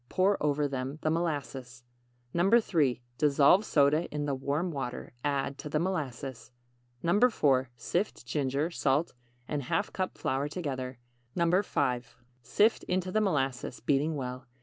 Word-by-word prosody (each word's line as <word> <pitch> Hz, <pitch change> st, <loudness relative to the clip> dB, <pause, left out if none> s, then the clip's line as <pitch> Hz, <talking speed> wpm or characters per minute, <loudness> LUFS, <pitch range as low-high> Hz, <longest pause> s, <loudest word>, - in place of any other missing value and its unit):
Pour 195 Hz, +2 st, +3 dB
over 145 Hz, 0 st, +1 dB
them 135 Hz, +1 st, -4 dB
the 155 Hz, -, +2 dB
molasses. 135 Hz, -7 st, -3 dB, 0.5 s
3. 170 Hz, -, +3 dB, 0.2 s
Dissolve 150 Hz, +6 st, +5 dB
soda 150 Hz, -2 st, +3 dB
in 145 Hz, 0 st, -3 dB
the 145 Hz, -, -1 dB
warm 145 Hz, +6 st, -1 dB
water. 130 Hz, -5 st, -5 dB
Add 140 Hz, -1 st, -1 dB
to 150 Hz, -, -6 dB
the 150 Hz, -, 0 dB
molasses. 140 Hz, -7 st, -3 dB, 0.6 s
4. 165 Hz, -, +3 dB
Sift 175 Hz, -, -2 dB
ginger, 140 Hz, +5 st, -1 dB
salt 145 Hz, 0 st, +1 dB, 0.3 s
and 145 Hz, -1 st, -2 dB
½ 200 Hz, +10 st, -1 dB
cup 185 Hz, -1 st, -3 dB
flour 135 Hz, +2 st, -1 dB
together. 135 Hz, -6 st, -4 dB, 0.4 s
5. 170 Hz, -, +1 dB, 0.2 s
Sift 210 Hz, -, +3 dB
into 185 Hz, 0 st, -1 dB
the 215 Hz, -, +2 dB
molasses, 135 Hz, -, -1 dB
beating 145 Hz, +5 st, +1 dB
well. 125 Hz, -1 st, -5 dB
145 Hz, 130 wpm, -30 LUFS, 135-170 Hz, 0.6 s, Dissolve